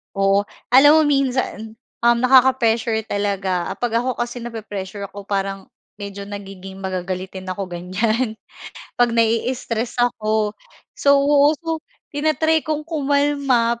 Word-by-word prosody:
Oo, 195 +1 +2 0.2
alam 290 +4 +8
mo 315 - +6
minsan, 260 -6 -1 0.2
um, 235 0 +4
nakaka-pressure 240 -4 +3
talaga, 195 -4 -1
ah, - - -4
'pag 235 -1 0
ako 250 0 -2
kasi 240 +1 -4
nape-pressure 205 -4 -6
ako 200 0 -10
parang 195 -1 -2 0.3
medyo 200 0 -6
nagiging 195 -1 -9
magagalitin 185 0 -4
ako, 190 +1 -4
ganyan. 215 +6 -2 0.6
'Pag 235 -1 +3
nai-stres 230 +1 0
ako 220 -3 0 0.4
so, 280 0 +4 0.4
so 325 0 -4 0.3
tina-try 315 +2 +2
kong 305 -1 -3
kumalma, 280 -6 +1
225 Hz, 115 wpm, -21 LUFS, 200-260 Hz, 0.6 s, alam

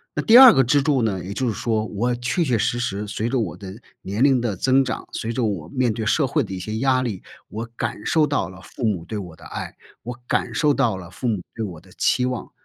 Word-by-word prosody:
那 - - -1
第 230 +1 +7
2 260 -3 +11
个 135 - +4
支 140 +3 +3
柱 140 -3 +1
呢， 95 -5 -1
也 95 - -6
就 130 +4 -1
是 115 - 0
说， 110 0 -1
我 115 +4 -1
确 125 +9 -1
确 125 -6 +1
实 120 - 0
实， 105 -3 -3
随 110 +2 -2
着 130 - 0
我 110 - -3
的 100 +1 -10 0.2
年 100 +4 -4
龄 135 -3 +4
的 115 -5 -1
增 135 +6 +3
长， 125 - -5
随 115 - -3
着 120 +1 -1
我 90 -7 -3
面 125 0 0
对 110 0 -4
社 140 +5 +2
会 150 +1 +1
的 95 - -7
一 95 - -5
些 110 +4 -4
压 130 0 +2
力， 110 -7 -4 0.2
我 110 +3 -5
感 115 -2 -4
受 155 -2 +3
到 140 -11 -1
了 95 - -12
父 125 - -10
母 95 -6 -1
对 110 - -5
我 90 -5 -7
的 85 - -16
爱， - - -6 0.3
我 120 +1 -7
感 120 - -1
受 145 +7 +2
到 120 -8 +1
了 90 -3 -10
父 125 - -4
母 105 -5 -1
对 115 - -3
我 90 -6 -6
的 90 +3 -20
期 125 - +1
望， 125 -1 -4
115 Hz, 280 characters per minute, -22 LUFS, 100-130 Hz, 0.3 s, 2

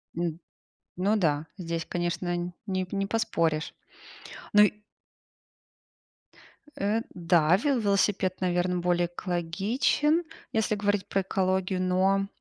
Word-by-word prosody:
М, 170 -1 -2 0.6
ну 200 +4 +2
да, 155 -5 +1
здесь, 170 -1 -3
конечно, 175 0 -2
не 185 -1 -1
не 195 0 -1
поспоришь. 165 -8 0 0.8
Ну 210 0 +7
и 210 - +5 2.1
Э, 210 +3 +1
да, 170 -1 +3
ве 270 +2 +1
велосипед, 200 -2 +1
наверно, 180 0 0
более 175 0 +1
экологичен, 200 - 0 0.3
если 220 -1 +1
говорить 205 -2 0
про 195 - 0
экологию. 185 0 0
Но, 190 +2 +2
185 Hz, 105 wpm, -27 LUFS, 175-200 Hz, 2.1 s, Ну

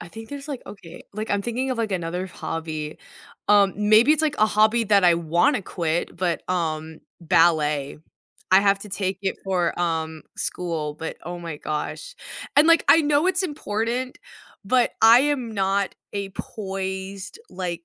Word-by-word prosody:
I 175 - -9
think 225 +4 -10
there's, 285 0 -8
like, 275 -4 -5
okay, 175 -5 -11
like, 215 +2 -5
I'm 200 0 +1
thinking 250 +3 -2
of, 250 - -2
like, 220 -3 -1
another 180 +1 -3
hobby, 160 -3 -5 0.5
um, 200 -2 +5
maybe 215 +6 +5
it's, 310 - +1
like, 305 -2 0
a 215 - +5
hobby 220 +2 +3
that 200 -2 +4
I 175 -1 +6
wanna 170 - +1
quit, 170 -2 -2
but, 175 -2 -2
um, 160 -3 -2 0.2
ballet. 155 -4 +2 0.5
I 190 +1 +7
have 200 -1 +3
to 210 - -8
take 190 -1 -2
it 190 - -1
for, 180 -3 0
um, 160 -2 -2
school, 160 -4 -3
but, 160 +1 -6
oh 175 +1 -6
my 165 -3 -6
gosh, 155 - -5 0.4
and, 295 +3 +7
like, 335 0 +5
I 320 +3 +7
know 295 +3 +2
it's 375 +1 +1
important, 250 - -3 0.5
but, 245 +4 +2
I 230 +2 +8
am 270 -5 -1
not 195 0 0 0.2
a 200 -1 -4
poised, 190 - -6
like, 175 -2 -5
195 Hz, 170 wpm, -23 LUFS, 170-230 Hz, 0.5 s, I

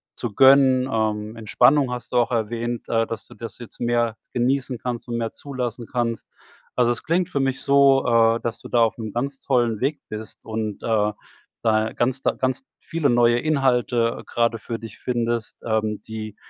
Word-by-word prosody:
zu 120 -4 -4
gönnen. 130 -1 +6
Ähm, 110 -1 -1
Entspannung 125 +5 +3
hast 125 -2 -6
du 125 - +1
auch 120 - +3
erwähnt, 115 +1 -2
äh, 115 -1 +1
dass 115 - -6
du - - -14
das 115 - -8
jetzt 120 - -12
mehr 120 -2 +1 0.2
genießen 130 +1 0
kannst 120 0 -5
und 120 -1 -2
mehr 115 -1 -2
zulassen 125 -4 -5
kannst. 120 -3 -2 0.5
Also, 120 -1 +3
es - - -9
klingt 175 +2 +1
für 180 -6 -2
mich 135 -1 -1
so, 140 -1 +4
äh, 115 -1 +4
dass 115 -1 -3
du - - -11
da 120 - +3
aufm 110 -1 -2
ganz 135 +3 -3
tollen 120 -5 +1
Weg 140 +2 0
bist 110 0 -8
und, 110 -2 -4
äh, 105 -2 +2 0.5
da 110 0 +2
ganz 130 +2 0
da - - +2
ganz 130 0 -2 0.2
viele 160 -3 -1
neue 120 0 +4
Inhalte 125 -5 +1
grade 115 -1 0
für 115 +1 -5
dich 110 -1 -10
findest, 120 -2 -2
ähm, 110 -2 0
die 110 -1 -6
120 Hz, 180 wpm, -23 LUFS, 115-130 Hz, 0.5 s, gönnen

